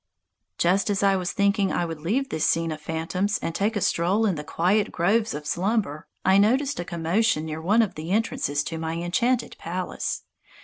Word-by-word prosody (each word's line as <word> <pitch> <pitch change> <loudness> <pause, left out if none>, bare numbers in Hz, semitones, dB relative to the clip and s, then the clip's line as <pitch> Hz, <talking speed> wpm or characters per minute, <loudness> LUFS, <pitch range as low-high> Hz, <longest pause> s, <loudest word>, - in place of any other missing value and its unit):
Just 190 +4 +2
as 200 -1 0
I 195 -1 +4
was 185 0 -1
thinking 200 0 +2
I 175 - 0
would 165 -2 -6
leave 245 - 0
this 160 - -2
scene 165 0 +1
of 155 0 -6
phantoms 165 +6 -1
and 165 - -4
take 210 +6 0
a 205 - -1
stroll 185 +7 +2
in 200 - +2
the 150 -2 -5
quiet 190 +7 +1
groves 210 +5 +1
of 150 0 -6
Slumber 180 -3 -1 0.2
I 190 +1 +5
noticed 265 +7 +2
a 175 - -3
commotion 170 +1 0
near 155 0 -5
one 210 +7 +4
of 210 - -3
the 155 +2 -7
entrances 215 - 0
to 165 +1 -5
my 160 0 -3
enchanted 225 +9 0
palace. 180 +2 -3
185 Hz, 200 wpm, -25 LUFS, 165-210 Hz, 0.2 s, I